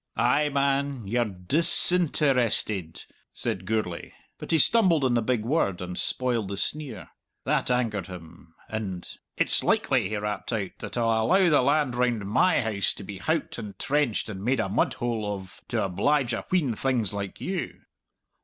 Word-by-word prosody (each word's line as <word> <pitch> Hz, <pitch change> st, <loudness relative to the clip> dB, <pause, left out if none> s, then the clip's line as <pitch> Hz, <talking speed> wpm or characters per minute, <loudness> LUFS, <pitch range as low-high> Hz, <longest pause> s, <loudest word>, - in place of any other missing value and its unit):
"Ay, 150 Hz, +1 st, +3 dB
man! 140 Hz, -3 st, 0 dB
You're 120 Hz, +4 st, +1 dB
dis 105 Hz, -, +3 dB
in 180 Hz, -3 st, +2 dB
ter 145 Hz, -2 st, +2 dB
ested!" 105 Hz, -8 st, 0 dB, 0.3 s
said 95 Hz, 0 st, -4 dB
Gourlay, 105 Hz, -6 st, -2 dB, 0.3 s
but -, -, -8 dB
he 165 Hz, -, +3 dB
stumbled 175 Hz, -3 st, +4 dB
on 130 Hz, -2 st, +2 dB
the 120 Hz, -, +2 dB
big 115 Hz, -1 st, -1 dB
word 115 Hz, -, 0 dB
and 90 Hz, 0 st, -5 dB
spoiled 120 Hz, -3 st, -1 dB
the 100 Hz, 0 st, -5 dB
sneer. 130 Hz, -, -4 dB, 0.4 s
That -, -, +1 dB
angered 115 Hz, -7 st, 0 dB
him, 85 Hz, -2 st, -12 dB
and, 100 Hz, -5 st, -5 dB, 0.3 s
"It's -, -, +3 dB
likely," -, -, +2 dB
he 105 Hz, -, -2 dB
rapped 105 Hz, 0 st, -4 dB
out, 105 Hz, -5 st, -2 dB
"that -, -, -6 dB
I'll 115 Hz, -1 st, +2 dB
allow 190 Hz, -1 st, +5 dB
the 145 Hz, -, +5 dB
land 140 Hz, 0 st, +2 dB
round 120 Hz, -4 st, 0 dB
my 135 Hz, -, +3 dB
house 110 Hz, -4 st, 0 dB
to -, -, -9 dB
be 100 Hz, -2 st, -8 dB
howked 165 Hz, -, -2 dB
and 105 Hz, -3 st, -8 dB
trenched 140 Hz, -5 st, 0 dB
and 100 Hz, -3 st, -7 dB
made 125 Hz, +2 st, +1 dB
a 110 Hz, -, 0 dB
mudhole 110 Hz, 0 st, -1 dB
of 95 Hz, 0 st, -11 dB
to 115 Hz, -3 st, -1 dB
oblige 125 Hz, +7 st, +1 dB
a 115 Hz, -, -3 dB
wheen 160 Hz, -10 st, +1 dB
things 115 Hz, -4 st, -1 dB
like 100 Hz, -1 st, -5 dB
you!" 185 Hz, -2 st, -4 dB
115 Hz, 175 wpm, -26 LUFS, 100-140 Hz, 0.4 s, allow